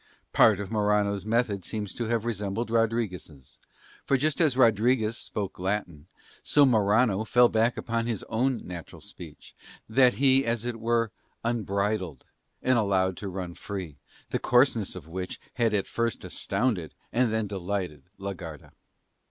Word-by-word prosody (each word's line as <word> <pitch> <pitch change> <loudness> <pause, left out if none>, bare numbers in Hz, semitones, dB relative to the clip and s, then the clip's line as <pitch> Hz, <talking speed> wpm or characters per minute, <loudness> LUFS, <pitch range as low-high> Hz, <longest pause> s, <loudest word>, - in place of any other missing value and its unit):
Part 110 -3 +6
of 100 0 -5
Morano's 105 -2 +1
method 110 -4 +1
seems 105 0 -4
to 120 - -3
have 115 0 -1
resembled 110 0 -2
Rodriguez', 110 - -2 0.4
for 135 - +2
just 155 +4 +1
as 145 -6 +3
Rodriguez 115 -1 +3
spoke 100 -5 -5
Latin, 90 -5 -3 0.3
so 145 -1 +4
Morano 110 -2 +3
fell 120 +2 +5
back 115 +2 +2
upon 115 0 -2
his 115 -4 -2
own 125 +2 -1
natural 90 -3 -8
speech, - - -12 0.3
that 125 +2 +4
he 135 0 +4
as 115 -1 -1
it 120 -2 -3
were 115 -1 +1 0.3
unbridled 100 - -1 0.4
and 130 -2 +3
allowed 95 -3 +1
to 100 - -5
run 90 -2 -5
free, 90 -8 -7 0.3
the - - 0
coarseness 120 -6 +2
of 85 -4 -9
which 90 +2 -5
had 115 -2 +1
at 105 -2 +1
first 115 -1 -2
astounded, 105 -11 -1 0.2
and 120 -1 +2
then 110 -1 0
delighted, 95 -5 -3 0.2
la 100 0 -4
Garda. 80 -5 -10
110 Hz, 150 wpm, -27 LUFS, 95-120 Hz, 0.4 s, Part